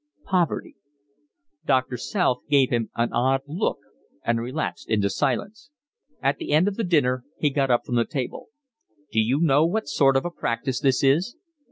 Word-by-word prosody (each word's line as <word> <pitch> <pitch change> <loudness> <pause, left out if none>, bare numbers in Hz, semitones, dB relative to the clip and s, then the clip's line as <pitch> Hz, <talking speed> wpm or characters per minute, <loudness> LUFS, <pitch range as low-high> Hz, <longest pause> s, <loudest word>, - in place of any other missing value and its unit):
"Poverty." 180 -4 -1 0.9
Doctor 130 -1 +1
South 125 - 0
gave 140 -3 +4
him 115 -3 0
an 115 0 0
odd 130 +3 +2
look 160 +9 -1 0.5
and 115 0 +1
relapsed 130 +7 -4
into 105 -3 +1
silence. 220 - -2 0.5
At - - +2
the 330 - -3
end 160 +6 +4
of 205 -1 -2
dinner 130 -6 +2
he 150 - +1
got 135 -1 0
up 120 -1 +2
from 120 - -1
the 115 - +3
table. 130 -3 -5 0.6
"D'you 110 +5 +2
know 150 -2 +4
what 180 +2 0
sort 135 -2 +3
of 135 - -1
a 175 - -2
practice 125 -3 -2
this 135 -3 +2
is?" 160 - +2
135 Hz, 165 wpm, -24 LUFS, 125-165 Hz, 0.9 s, gave